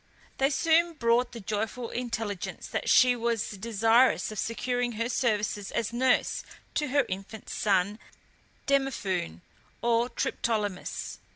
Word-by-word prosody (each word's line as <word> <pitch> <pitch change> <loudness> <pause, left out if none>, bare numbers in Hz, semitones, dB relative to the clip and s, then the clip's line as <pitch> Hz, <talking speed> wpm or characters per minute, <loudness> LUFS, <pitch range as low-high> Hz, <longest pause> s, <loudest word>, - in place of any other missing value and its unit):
They 270 0 +4
soon 330 +4 +3
brought 235 -2 +2
the 235 - -8
joyful 220 +3 -3
intelligence 225 -5 -4
that - - -2
she 250 -1 +6
was 235 -2 -1
desirous 225 +4 +3
of 215 - -5
securing 245 +1 -1
her 230 +2 -1
services 210 -5 0
as 235 -1 -2
nurse 255 +1 +2 0.3
to 300 - 0
her 280 0 +2
infant 195 +3 -7
son 200 +1 +1 0.7
Demophoon, 200 - 0 0.4
or 235 +1 +2
Triptolemus. 210 -8 -2
230 Hz, 120 wpm, -28 LUFS, 210-250 Hz, 0.7 s, she